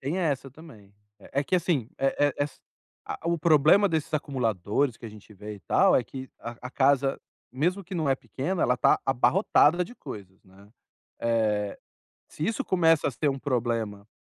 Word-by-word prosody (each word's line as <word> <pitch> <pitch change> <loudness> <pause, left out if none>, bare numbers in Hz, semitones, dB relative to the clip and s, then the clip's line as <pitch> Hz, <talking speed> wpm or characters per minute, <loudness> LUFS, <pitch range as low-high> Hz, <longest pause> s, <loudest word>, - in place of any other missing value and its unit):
Tem 145 +8 -2
essa 140 -6 -1
também. 130 -9 -15 0.3
É 140 - -3
é - - -3
que, 185 - -1
assim, 155 -10 0
eh 135 0 +1
eh, 145 -1 +2
es 145 - -10 0.5
a - - -5
O 170 - +1
problema 160 +5 +5
desses 160 -2 -2
acumuladores 125 - -1
que - - -15
a - - -7
gente 105 0 -15
vê 105 +2 -8
e 100 - -17
tal - - +3
é - - +2
que 130 +4 -8
a 120 0 -7
a 125 - -6
casa, 135 0 +2 0.3
mesmo 175 +9 -1
que 185 +2 -8
não 155 -4 -1
é 135 - +4
pequena, 165 +7 -3
ela 125 0 +2
tá - - +4
abarrotada 160 - +3
de 245 - -13
coisas, 95 - -10
né. 95 +2 -19 0.5
Eh, 110 -3 0 0.5
se 150 - -5
isso 225 -1 -1
começa 165 -4 +3
a - - -1
ser 145 +4 0
um 135 0 -3
problema 115 -6 -2
135 Hz, 190 wpm, -27 LUFS, 115-160 Hz, 0.5 s, problema